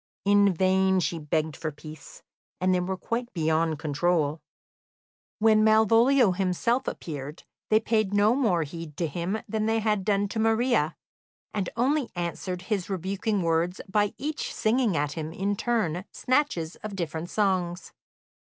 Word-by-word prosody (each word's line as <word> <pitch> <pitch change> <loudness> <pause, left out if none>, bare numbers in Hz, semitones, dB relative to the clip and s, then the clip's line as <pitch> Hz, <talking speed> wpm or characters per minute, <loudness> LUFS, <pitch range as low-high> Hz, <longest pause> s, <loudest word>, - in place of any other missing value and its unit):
In 200 0 +5
vain 190 +1 +2
she 170 -1 -1
begged 155 0 -1
for 160 -1 -4
peace; 155 +1 -12 0.4
they 185 0 +2
were 185 +1 -2
quite 235 +5 -3
beyond 160 -1 +1
control. 155 +1 0 1.0
When 215 0 +4
Malvolio 225 +2 +5
himself 195 +7 0
appeared, 145 -1 -6 0.3
they 215 - +5
paid 220 -3 0
no 205 +2 +4
more 215 -11 +2
heed 155 0 -8
to 170 - 0
him 170 +6 -2
than 215 0 -1
they 225 0 +2
had 210 -3 0
done 205 0 +1
to 220 - -3
Maria, 225 - +2 0.6
and 200 -4 -2
only 270 +2 +1
answered 175 +1 -4
his 195 -2 -2
rebuking 195 +2 -1
words 165 +2 0
by 205 +1 +1
each 300 +2 -3
singing 220 -4 +1
at 145 0 0
him 155 0 -5
in 200 +4 -1
turn 195 -6 -1
snatches 255 - 0
of 215 -2 -7
different 165 -1 -4
songs. 185 -5 -1
190 Hz, 145 wpm, -26 LUFS, 165-220 Hz, 1.0 s, In